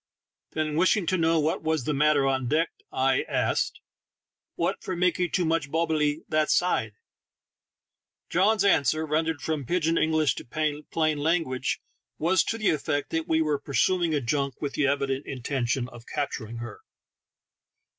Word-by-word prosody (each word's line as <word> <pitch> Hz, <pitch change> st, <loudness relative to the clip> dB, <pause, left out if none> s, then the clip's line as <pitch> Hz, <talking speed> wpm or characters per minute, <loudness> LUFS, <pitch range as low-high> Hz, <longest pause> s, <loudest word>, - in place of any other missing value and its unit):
Then, 155 Hz, -1 st, -1 dB
wishing 185 Hz, +2 st, +3 dB
to 185 Hz, -, +1 dB
know 165 Hz, 0 st, +3 dB
what 155 Hz, +2 st, 0 dB
was 160 Hz, -3 st, 0 dB
the 150 Hz, -, -1 dB
matter 145 Hz, 0 st, +3 dB
on 130 Hz, -2 st, 0 dB
deck, 160 Hz, +5 st, +1 dB, 0.2 s
I 130 Hz, 0 st, +2 dB
asked, -, -, 0 dB, 0.7 s
"What -, -, -1 dB
for 185 Hz, -, -4 dB
makee 180 Hz, 0 st, +1 dB
too 180 Hz, +1 st, 0 dB
muchee 160 Hz, -3 st, 0 dB
bobblely 155 Hz, -1 st, 0 dB
that 155 Hz, -1 st, +1 dB
side? 110 Hz, -, +1 dB, 0.7 s
" -, -, -63 dB
John's 200 Hz, +4 st, +3 dB
answer, 155 Hz, -4 st, +3 dB
rendered 160 Hz, 0 st, -1 dB
from 155 Hz, -3 st, -2 dB
pidj 170 Hz, +4 st, 0 dB
in 165 Hz, 0 st, +2 dB
English 155 Hz, -4 st, +2 dB
to 150 Hz, +3 st, -2 dB
plain 155 Hz, -2 st, +1 dB
language, 155 Hz, -4 st, 0 dB, 0.4 s
was 170 Hz, +3 st, +3 dB
to 225 Hz, -, -2 dB
the 215 Hz, -2 st, +2 dB
effect 145 Hz, -1 st, -2 dB
that 160 Hz, 0 st, -1 dB
we 160 Hz, 0 st, +2 dB
were 150 Hz, -2 st, 0 dB
pursuing 165 Hz, +4 st, +1 dB
a 145 Hz, -, 0 dB
junk 140 Hz, +1 st, -1 dB
with 145 Hz, -2 st, -3 dB
the 145 Hz, -, +1 dB
evident 140 Hz, 0 st, -1 dB
intention 130 Hz, -1 st, -2 dB
of 120 Hz, -1 st, -13 dB
cap 145 Hz, -2 st, -2 dB
turing 115 Hz, -1 st, -7 dB
her. 110 Hz, -3 st, -8 dB
155 Hz, 165 wpm, -26 LUFS, 140-165 Hz, 0.7 s, wishing